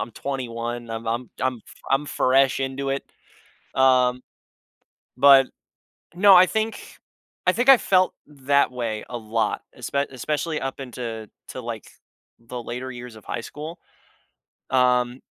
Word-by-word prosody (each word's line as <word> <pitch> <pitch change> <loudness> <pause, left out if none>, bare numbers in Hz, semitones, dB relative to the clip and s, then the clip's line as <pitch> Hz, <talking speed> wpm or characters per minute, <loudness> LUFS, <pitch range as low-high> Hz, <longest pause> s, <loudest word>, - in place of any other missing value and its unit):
I'm 115 - -4
21, 120 -3 -4
I'm 115 0 -5
I'm 120 +2 -2
I'm 130 -3 -1
fr - - -18
I'm 140 +2 +2
fresh 135 0 +2
into 135 +1 -2
it, 135 0 -1 0.7
um, 125 -1 +3 1.0
but 135 0 +7 0.7
no, 195 +2 +7
I 185 +1 +8
think 220 +3 -1 0.7
I 180 - +5
think 245 +6 -1
I 270 - +11
felt 185 -3 +2
that 140 -1 +1
way 115 -3 -3
a 120 - -4
lot, 110 -1 -1 0.2
espe 140 0 -1
especially 155 +5 -2
up 135 +1 -4
into 115 -4 -6 0.2
to, 130 - -6
like, 115 -2 -6 0.5
the 120 +1 -8
later 125 +3 -5
years 120 -1 -9
of 110 - -14
high - - -4
school, 155 +8 -8 0.9
um 125 -1 +2
130 Hz, 140 wpm, -24 LUFS, 120-140 Hz, 1.0 s, I